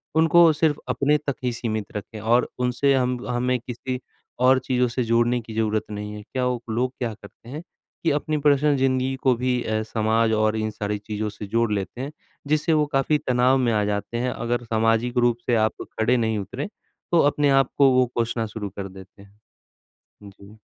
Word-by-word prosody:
उनको 165 +1 +6
सिर्फ़ 155 -1 +1
अपने 145 +2 +2
तक 145 -2 -3
ही 125 - +1
सीमित 110 -3 -3
रखें 105 +1 -6
और 115 +3 +2
उनसे 125 +3 +2
हम 125 -1 +1
हमें 125 +1 0
किसी 125 +1 -5 0.4
और 130 +1 +5
चीज़ों 125 -1 +1
से 125 +2 -2
जोड़ने 120 +1 +2
की 110 0 -10
ज़रूरत 110 -1 0
नहीं 105 0 -5
है। 105 - -7
क्या 130 +3 -3
वो 125 -1 -1
लोग 125 +4 -1
क्या 120 -3 -2
करते 115 +2 -15
हैं 150 +4 -6 0.4
कि 165 - +2
अपनी 150 +1 -1
पर्सनल 145 0 +3
ज़िंदगी 130 0 +1
को 130 -2 +4
भी 125 +1 0
अ, 110 0 -1
समाज 110 +1 +1
और 110 0 +2
इन 110 0 -1
सारी 105 0 -3
चीज़ों 105 +1 -4
से 105 0 -8
जोड़ 115 +2 +1
लेते 100 +4 -4
हैं, 140 +3 -5 0.4
जिससे 155 +2 +2
वो 150 -1 +3
काफ़ी 135 +3 +2
तनाव 125 +1 +3
में 125 -3 +1
आ 105 - +2
जाते 105 +3 -2
हैं, 125 +1 0
अगर 120 0 -2
सामाजिक 115 +2 +1
रूप 120 -1 +3
से 120 - +2
आप 110 - -4 0.2
खड़े 125 +3 +3
नहीं 110 -2 0
उतरे, 125 - -5 0.4
तो 170 - +4
अपने 145 -1 +1
आप 135 -1 +3
को 140 -2 +6
वो 130 0 +4
कोसना 115 -1 -1
शुरू 105 -1 -6
कर 100 -1 -4
देते 95 +1 -14
हैं। 100 +1 -19 0.9
जी। 100 +2 -16
120 Hz, 200 wpm, -23 LUFS, 110-130 Hz, 0.9 s, उनको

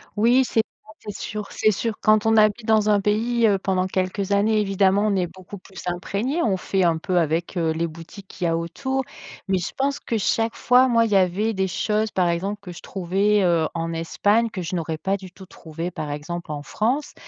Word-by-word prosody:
Oui, 240 +5 +4
c'est 225 - +2
pas - - -63 0.3
c'est 210 -1 -7
sûr, 210 -1 -5
c'est 215 - +2
sûr. 225 +3 -2
Quand 215 0 +4
on 225 0 +4
habite 215 +1 +3
dans 215 -1 +3
un 205 -1 +4
pays, 225 +3 +1
heu, 200 -2 +3
pendant 185 -1 0
quelques 185 +1 -2
années, 215 +2 +3
évidemment, 195 0 +2
on 205 - +1
est 180 -2 0
beaucoup 185 +3 -11
plus 190 -1 -12
imprégné. 200 - -2
On 195 -4 +1
fait 190 +1 0
un 165 -2 +3
peu 180 +3 -1
avec, 165 +3 -1
heu, 165 -2 +1
les 165 +1 -1
boutiques 165 +5 -12
qu'il - - -8
y - - +3
a 165 - +1
autour, 265 +11 -2 0.4
mais 190 -1 +2
je 175 - -4
pense 280 +1 0
que, 230 - -2
chaque 225 +2 0
fois, 250 +1 +4
moi, 230 -1 +4
il 220 - -3
y - - +3
avait 195 +4 +2
des 190 -1 0
choses, 215 +4 -1
par 180 -2 +1
exemple, 190 +5 -2
que 180 -3 -9
je 170 - -11
trouvais, 195 +3 +1
heu, 170 -3 +2
en 165 0 -2
Espagne 205 +7 +1
que 190 - -5
je 175 +1 -4
n'aurais 160 -2 -3
pas 195 +5 -1
du 190 -2 -9
tout 190 +1 -13
trouvées, 165 -1 -7
par 155 -3 -5
exemple, 160 +3 -5
en 145 -1 -5
France 250 - -1
195 Hz, 230 wpm, -23 LUFS, 175-215 Hz, 0.4 s, Oui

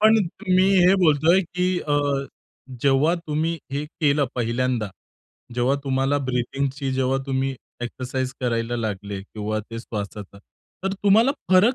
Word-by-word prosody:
पण 220 +1 +6 0.4
मी 185 +1 +5 0.2
हे 185 - +6
बोलतोय, 170 +1 +4
की 180 +1 -1
अ, 145 - -1 0.9
जेव्हा 140 +5 +4
तुम्ही 165 0 -2
हे 145 +2 -1
केलं 145 -2 +1
पहिल्यांदा, 120 -1 0 0.7
जेव्हा 125 +3 +2
तुम्हाला 135 +1 +1
ब्रीथिंगची, 135 +2 -1
जेव्हा 130 0 +1
तुम्ही 135 0 0 0.3
एक्सरसाइज 130 +1 -3
करायला 120 -1 -1
लागले, 100 -3 -3
किंवा 105 +1 -4
ते 115 - -5
श्वासाचा. 105 -3 -6 0.5
तर 195 - 0
तुम्हाला 205 +6 +4 0.2
फरक 195 +7 +6
135 Hz, 130 wpm, -23 LUFS, 120-165 Hz, 0.9 s, पण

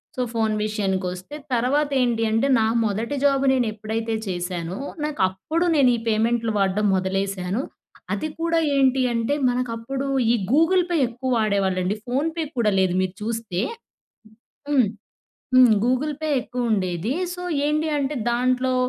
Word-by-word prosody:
So, 255 - -2
phone 220 -1 +1
విషయానికి 195 -3 -1
వస్తే. 185 +10 -9 0.2
తర్వాత 275 +5 +1
ఏంటి 235 -2 +1
అంటే, 225 +5 +2
నా 220 - +3 0.2
మొదటి 220 +7 -2
జాబు 275 -1 +3
నేను 250 -3 +1
ఎప్పుడైతే 220 +1 -3
చేశానో, 175 0 -3 0.3
నాకు 300 -6 -2
అప్పుడు 315 - -2
నేను 275 -4 +5
ఈ - - -5
పేమెంట్లు 225 +1 +1
వాడడం 195 +2 +1
మొదలేశాను. 195 +2 -1 0.5
అది 310 - -2
కూడా 330 0 +1 0.2
ఏంటి 265 -1 +3
అంటే, 230 +4 0 0.2
మనకు 245 -1 -1
అప్పుడు 270 +4 -4 0.3
ఈ - - +4 0.2
గూగుల్ 330 +6 +4
పే 345 - +1
ఎక్కువ 245 +2 -5
వాడేవాళ్ళండి 195 -3 +1
ఫోన్ 275 +6 0
పే 325 - 0
కూడా 215 -3 +2
లేదు. 185 -1 +2
మీరు 185 0 -2
చూస్తే 220 -4 -2 1.1
హ్మ్. 260 -7 +4 0.7
హ్మ్. 255 -3 +7
గూగుల్ 255 +5 +1
పే 310 - -1
ఎక్కువ 245 -1 -3
ఉండేది. 185 +3 -1 0.2
సో, 360 - -7 0.3
ఏంటి 305 +1 0
అంటే 280 +2 -2
దాంట్లో 255 +1 +1
230 Hz, 150 wpm, -23 LUFS, 200-270 Hz, 1.1 s, హ్మ్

